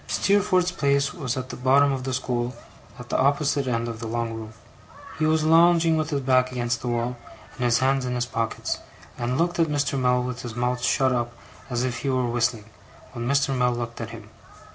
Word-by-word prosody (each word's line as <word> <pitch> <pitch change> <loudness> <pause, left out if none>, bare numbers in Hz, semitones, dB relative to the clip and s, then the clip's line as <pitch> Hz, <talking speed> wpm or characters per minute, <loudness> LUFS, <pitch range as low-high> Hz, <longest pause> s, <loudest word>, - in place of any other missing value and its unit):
Steerforth's 185 -3 +2
place 140 -3 +1
was 135 -6 -3
at 130 0 -4
the - - -6
bottom 135 +3 +4
of 130 -1 -3
the 130 - -2
school, 125 -1 -2 0.4
at - - -10
the - - 0
opposite 140 0 +2
end 115 -1 -1
of 115 -2 -5
the 115 - -5
long 115 0 -2
room. 110 -1 -7 0.7
He 155 - +2
was 155 0 +2
lounging 165 +1 +5
with 155 -1 -1
his 140 -3 -1
back 130 -1 +2
against 120 -2 -2
the - - -5
wall, 120 +1 -1 0.4
and 125 - -3
his 120 0 +4
hands 135 0 +2
in 125 0 -2
his 120 0 0
pockets, 115 -2 -2 0.4
and 120 +2 -1
looked 175 +2 0
at 165 - +4
Mr. 145 -2 0
Mell 125 -1 +2
with 125 -1 -4
his 120 -2 -7
mouth 125 +1 -1
shut 130 +1 +2
up 120 -1 -1 0.4
as 120 -1 -1
if 125 -2 -2
he 140 - -2
were 130 -1 +1
whistling, 115 -2 0 0.5
when 120 0 -4
Mr. 140 0 +2
Mell 125 -1 +2
looked 120 -1 -5
at 115 - -5
him. 110 -2 -11
125 Hz, 215 wpm, -24 LUFS, 120-140 Hz, 0.7 s, lounging